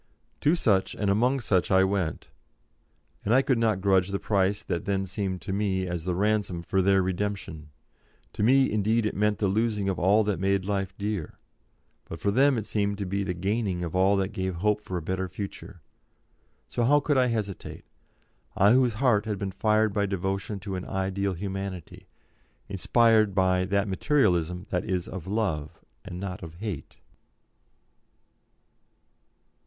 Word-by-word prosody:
To 155 +4 +3
such, 100 - +1
and 100 -2 0
among 125 +6 +2
such 95 -6 +1
I 95 0 +5
went, 95 -5 -2 0.9
and 115 - +2
I 135 - +5
could 130 -4 +1
not 110 -4 +1
grudge 95 -2 +3
the 100 0 -2
price 100 0 0
that 85 -1 -3
then 100 -1 0
seemed 95 0 -4
to 95 - -4
me 95 -2 0
as 90 -2 -4
the 90 -1 -1
ransom 100 -3 0
for 95 +2 +1
their 95 0 +3
redemption. 95 -5 -4 0.6
To - - -4
me, 130 +4 +4
indeed, 110 +2 +1
it 105 - -2
meant 105 +1 +1
the 100 - 0
losing 105 0 0
of 95 - -2
all 100 +5 +4
that 105 -2 -1
made 95 0 +1
life 95 -1 -2
dear, 100 -5 -4 0.7
but 80 - -8
for 100 - 0
them 135 +4 +4
it 110 - -3
seemed 100 -2 -1
to 100 - -3
be 100 +2 -2
the 90 -2 -3
gaining 95 -1 -1
of 85 0 -4
all 95 +2 +4
that 95 -1 0
gave 95 -3 -3
hope 105 +4 -1
of 95 - -3
a 90 - -2
better 95 +2 -2
future. 95 -1 -8 0.9
So - - -3
how 145 +5 +5
could 145 -2 +1
I 125 - +3
hesitate 105 -5 -4 0.7
I 100 +2 +5
whose 125 -2 +3
heart 115 -4 +2
had 105 -2 -2
been 95 0 -3
fired 110 +1 +1
by 100 -1 +1
devotion 95 +2 -3
to 100 0 -5
an 90 - -5
ideal 95 0 -2
Humanity, 95 -2 -6 0.6
inspired 110 +1 +3
by 95 -1 +2
that 100 +2 0
Materialism 90 - +1
that 90 0 0
is 95 -4 -2
of 95 -2 -7
love 95 -8 -2 0.2
and 90 - -7
not 95 -1 -5
of 80 -1 -9
hate? 100 -4 -6
100 Hz, 170 wpm, -27 LUFS, 95-105 Hz, 0.9 s, I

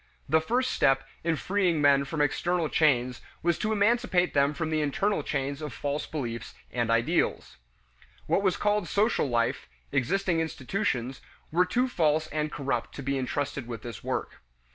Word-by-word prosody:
The 160 0 +3
first 250 +9 0
step 135 0 +2 0.2
in 165 0 +1
freeing 185 -1 +1
men 140 -1 +4
from 150 +1 -2
external 170 +3 +1
chains 125 -5 +2 0.2
was 170 -1 +1
to 215 - 0
emancipate 210 -4 +2
them 140 +1 +3
from 160 -2 -2
the 155 -1 +1
internal 195 +8 0
chains 140 0 -2
of 150 -3 -5
false 145 +1 -3
beliefs 120 -6 -5 0.2
and 120 -2 -1
ideals. 115 +1 +1 0.7
What - - +2
was 190 -2 +1
called 210 -3 +1
social 205 -3 +2
life, 115 - 0 0.2
existing 180 +5 +1
institutions, 135 - -2 0.3
were 175 +3 +4
too 245 +8 +1
false 155 -8 +2
and 150 0 -2
corrupt 140 -2 -2
to 140 - -6
be 140 +1 -1
intrusted 140 0 -2
with 115 -3 -6
this 120 -4 -7
work. - - -3
150 Hz, 165 wpm, -28 LUFS, 135-180 Hz, 0.7 s, men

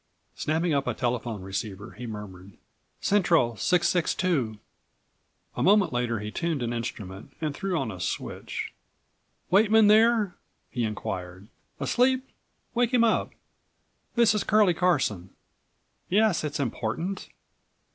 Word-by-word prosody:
Snapping 160 +2 0
up 140 -1 0
a - - -1
telephone 120 -4 -2
receiver 95 +2 -5
he 120 0 -8
murmured: 100 -3 -8 0.5
"Central 165 - +3
662." 170 - +1 1.0
A - - -2
moment 195 -6 +4
later 120 -2 0
he 105 0 -5
tuned 165 -3 -1
an 120 0 -2
instrument 110 -2 -6
and 155 -3 -2
threw 185 +3 -2
on 110 - -2
a 95 - -8
switch; 90 - -4 0.8
"Weightman 215 +3 +6
there?" 220 -2 +4 0.4
he 120 -3 -1
inquired. 95 -2 -5 0.3
"Asleep? 260 +1 +2 0.5
Wake 240 0 +2
him 235 - +5
up. 225 - +2 0.9
This 235 -3 +5
is 210 -2 0
Curlie 210 -4 +4
Carson. 140 - +1 0.8
Yes, 210 -3 +3
it's 150 -1 -3
important. 145 - -3
150 Hz, 120 wpm, -27 LUFS, -, 1.0 s, Weightman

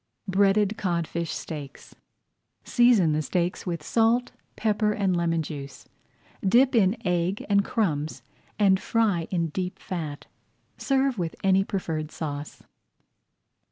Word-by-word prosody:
BREADED 200 +2 +2
CODFISH 170 -2 -2
STEAKS 145 -4 -7 0.7
Season 240 -9 +4
the 155 - +1
steaks 175 +5 -2
with 170 -3 -3
salt, 230 +6 +2 0.2
pepper, 210 -1 +1
and 195 -3 +1
lemon 165 -1 0
juice, 140 -3 -8 0.6
dip 245 +7 +4
in 210 -2 +3
egg 180 +2 0
and 200 -1 +3
crumbs, 150 - -1 0.3
and 195 -3 +4
fry 205 -9 +1
in 170 -3 0
deep 180 +3 -4
fat. 155 -6 -5 0.5
Serve 270 -4 0
with 165 -2 -2
any 195 0 +4
preferred 160 -6 -3
sauce. 145 -2 -6
185 Hz, 120 wpm, -26 LUFS, 165-210 Hz, 0.7 s, Season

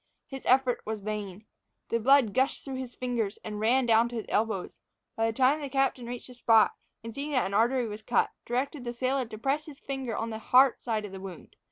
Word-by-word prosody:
His 270 -1 -8
effort 255 -1 +3
was 220 0 -3
in 200 - -15
vain. 210 -1 -5 0.4
The 230 - +1
blood 255 -2 +4
gushed 265 +2 0
through 270 -2 -5
his 255 -2 -6
fingers, 235 -5 -2
and 210 -1 -5
ran 245 +4 +3
down 230 0 +4
to 240 - -7
his 225 - -3
elbows. 215 -4 -1 0.4
By 225 0 +1
this 225 - -6
time 270 +4 +3
the 285 - -4
captain 270 -3 0
reached 245 0 -6
the 250 - -12
spot, 225 -2 +4 0.3
and 230 0 -7
seeing 285 +4 -4
that 255 - +2
an 195 - -4
artery 240 +4 +2
was 210 -1 -6
cut, - - +1
directed 260 +3 -2
the 240 -1 -4
sailor 255 +2 0
to 220 -1 -9
press 275 +7 -1
with 290 -3 -10
his - - -24
finger 265 -5 -3
on 225 0 -3
the 220 - -5
heart 255 +3 +4
side 220 -3 -2
of 205 - -8
the 190 - -8
wound. 190 -3 -10
240 Hz, 240 wpm, -28 LUFS, 220-265 Hz, 0.4 s, blood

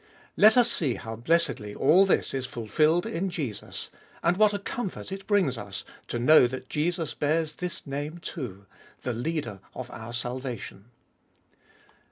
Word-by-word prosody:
Let 215 +3 +7
us 240 -1 +5
see 140 - 0
how 110 0 -6
blessedly 120 -5 0
all 195 +3 +5
this - - +2
is 130 -1 -2
fulfilled 150 - +2
in 185 +4 -1
Jesus, 140 - -5 0.3
and 170 +2 +3
what 210 +1 +5
a 205 - -1
comfort 200 -1 -5
it 195 0 -6
brings 185 - +2
us - - -6 0.2
to - - -2
know 125 +2 +7
that 130 +1 -7
Jesus 165 +1 -1
bears 155 +1 0
this 180 -1 -6
name 145 +4 -4
too: 125 - -6 0.4
the 125 - -1
Leader 120 -4 -3 0.2
of 130 -1 -6
our 110 +1 -7
salvation. 120 -4 -5
150 Hz, 155 wpm, -27 LUFS, 120-175 Hz, 0.4 s, Let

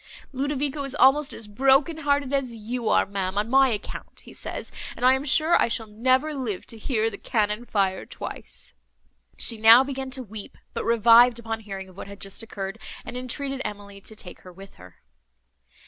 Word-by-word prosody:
Ludovico 285 +1 -2
is 275 0 -4
almost 290 +1 +4
as 225 - -5
broken 270 +8 +3
hearted 285 -3 0
as 260 -4 -1
you 230 +2 -3
are, - - +4
ma'am, 195 -1 -3
on 215 +3 0
my 270 0 +6
account, 210 -3 -6
he - - -14
says, - - -5 0.2
and 250 - -2
I 255 - +7
am 265 +1 0
sure 310 +4 +4
I - - +3
shall 230 -1 -1
never 255 +8 +1
live 245 -9 -4
to 225 - -7
hear 225 -1 0
the 200 - -9
cannon 210 +1 0
fire 195 -2 0
twice!" - - -8 0.6
She 230 - +1
now 225 +3 +9
began 270 -1 -5
to 260 0 -1
weep, 215 -2 -8 0.2
but - - -3
revived 235 +1 +6
upon 225 -1 -4
hearing 195 -3 -7
of 185 0 -17
what - - -7
had 200 0 -11
just 195 +2 -6
occurred, 205 -1 -6 0.3
and - - -7
entreated 265 +2 -4
Emily 200 -1 -7
to 220 - -5
take 185 -4 -6
her 185 - -13
with 195 +2 -13
her. 90 -1 -16
230 Hz, 195 wpm, -25 LUFS, 205-265 Hz, 0.6 s, now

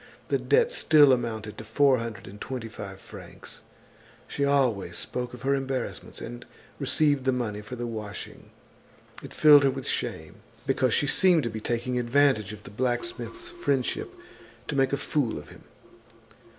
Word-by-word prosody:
The - - +2
debt 475 0 +3
still 150 - +6
amounted 110 -3 -3
to - - -7
four 130 +4 +3
hundred 115 -2 -6
and 100 +2 -11
twenty 125 -4 -5
five 95 -3 -8
francs. - - -11 0.7
She 140 - -2
always 125 -11 +1
spoke 125 0 -4
of 125 - -13
her 135 +1 +2
embarrassments 135 -1 -4
and - - -7 0.4
received 145 -3 +2
the 130 - +2
money 115 -5 -2
for 105 +4 -8
the 120 0 -4
washing. 110 -3 -7 0.7
It - - -10
filled 150 -2 +7
her 135 - +4
with 135 0 -5
shame, - - -3 0.3
because 130 -3 +2
she - - +2
seemed 175 +2 +4
to 115 - -2
be 110 0 -6
taking 120 +2 -1
advantage 120 -4 +2
of 105 -1 -10
the - - -11
blacksmith's 345 - -3
friendship 140 - -1 0.6
to 150 - -2
make 135 -1 +2
a 140 - +1
fool 140 - -1
of 75 - -10
him. - - -15
125 Hz, 165 wpm, -27 LUFS, 110-140 Hz, 0.7 s, filled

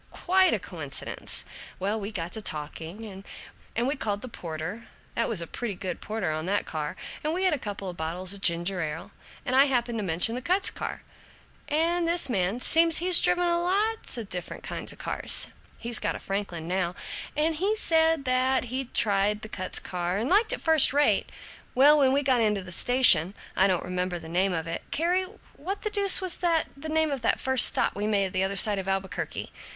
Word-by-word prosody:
Quite 375 +1 +3
a - - +1
coincidence! - - -3 0.3
Well, 205 +4 -2
we 205 +1 -6
got 175 -4 -5
to 220 - -3
talking, 190 +5 -6 0.5
and 235 +2 0
we 280 - -1
called 205 -6 -3
the - - -6
porter 180 +2 -7 0.3
that 230 - -1
was 215 -7 +1
a - - -4
pretty 215 +4 -5
good 185 -2 -6
porter 210 -6 -3
on 155 +2 -4
that 205 +2 0
car 150 -2 -5 0.3
and 310 +2 -1
we 370 - -2
had 370 -3 +3
a 295 - -2
couple 200 -4 -6
bottles 175 +3 -1
of 200 - -9
ginger 175 +2 +1
ale, 155 0 -6 0.3
and 255 -2 -1
I 270 +1 +6
happened 240 -4 -1
to - - -3
mention 180 +5 0
the 250 - -4
Kutz 370 +8 +1
Kar, - - -6 0.6
and 335 +3 0
this 340 -3 +1
man 195 +2 -1
seems 330 +4 +5
he's 360 0 +5
driven 355 0 +3
a 345 0 +1
lot 410 - -1
of 225 -3 -5
different 180 -2 -6
kinds - - -4
of - - -12
cars - - +1 0.3
he's 235 -1 -3
got - - -2
a - - -6
Franklin 195 -5 -5
now 180 -1 -2 0.4
and 310 +1 0
he 400 +6 0
said 320 -6 +1
that 255 0 +1
he'd 260 -1 -5
tried 210 0 +2
the 215 - -8
Kutz 185 -2 0
and 180 +6 -2
liked 425 +4 +3
it - - -4
first 320 -4 +7
rate. 290 +1 +2 0.5
Well, 290 +4 +6
when 265 -2 +4
we 280 +2 +1
got 260 -3 +2
into 210 -3 +1
a 185 -1 -11
station 195 -4 +5 0.2
I 190 - +4
don't 185 -3 -1
remember 180 0 -3
the 165 -1 -11
name 185 +4 0
of 165 -2 -3
it 165 0 -5
Carrie, 360 +4 0 0.3
what 380 +7 -5
the 425 - -2
deuce 400 -2 +5
was 370 -2 -1
the 335 -3 +1
name 315 +1 -1
of 275 -3 -3
that 230 - 0
first 260 -2 +6
stop - - +2
we 205 +1 -3
made 200 -3 0
the 185 0 0
other 195 +1 -2
side 205 +1 +4
of 190 - -6
Albuquerque? 195 0 -4
220 Hz, 205 wpm, -26 LUFS, 185-305 Hz, 0.6 s, first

